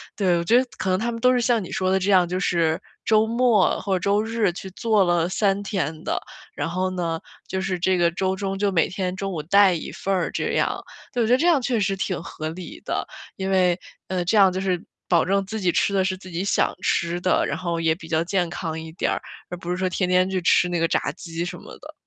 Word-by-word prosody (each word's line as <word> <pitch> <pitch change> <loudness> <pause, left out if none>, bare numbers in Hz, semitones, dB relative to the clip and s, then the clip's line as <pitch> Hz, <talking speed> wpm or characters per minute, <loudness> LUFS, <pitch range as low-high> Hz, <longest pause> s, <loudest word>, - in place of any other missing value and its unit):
对， 180 -4 +2
我 170 - -1
觉 225 +8 +3
得 255 - +4
可 185 - -2
能 185 - +2
他 235 +2 -1
们 230 - -5
都 250 +2 +4
是 245 - +2
像 235 -4 +2
你 - - -9
说 185 0 0
的 190 - +3
这 195 +2 0
样， 180 -2 +5
就 185 +1 -1
是 165 -4 +1 0.3
周 215 0 +4
末 230 -3 +3
或 195 -1 0
者 - - 0
周 200 +3 +2
日 225 -3 0
去 190 +1 -7
做 215 0 +2
了 175 -1 +2
3 195 +1 +1
天 165 -6 -3
的。 - - -1 0.3
然 - - -2
后 185 +2 -1
呢， 165 -3 -2 0.3
就 190 - -2
是 190 -1 -2
这 185 +1 +2
个 170 -1 +3
周 190 +2 -1
中 195 0 -3
就 205 -1 +1
每 170 -3 +3
天 185 0 -3
中 195 0 -3
午， 155 - -3
带 195 +3 +5
一 165 - -5
份 195 - -2
儿 180 -3 0
这 - - -2
样。 - - 0 0.3
对， 240 -2 0
我 - - 0
觉 245 - +4
得 255 - +6
这 335 - +2
样 330 -5 +5
确 245 -2 0
实 195 -1 0
挺 185 -2 -2
合 155 -1 -6
理 175 +2 -8
的。 - - -2 0.3
因 190 0 -2
为， 185 -2 +3 0.3
呃， 185 -1 -1
这 210 +5 +2
样 190 -2 +6
就 185 - -2
是 185 -2 0 0.3
保 170 -3 +4
证 195 +1 +1
自 220 +2 -4
己 180 -2 +2
吃 200 - +1
的 190 -1 +2
是 190 - 0
自 185 0 -12
己 175 +1 -3
想 - - +2
吃 170 +1 0
的， 185 - +2
然 - - -2
后 170 -2 -2
也 160 -1 +2
比 165 - -12
较 160 0 +1
健 180 0 0
康 160 -2 -4
一 160 0 -8
点， 175 - -1 0.4
而 180 - -5
不 175 0 -5
是 180 - -1
说 185 0 0
天 180 0 -1
天 185 +1 +3
去 190 -1 0
吃 180 +1 +4
那 175 - -1
个 165 - +2
炸 - - 0
鸡 165 0 -5
什 175 - -5
么 - - -12
的。 - - -12
185 Hz, 285 characters per minute, -23 LUFS, 175-200 Hz, 0.4 s, 得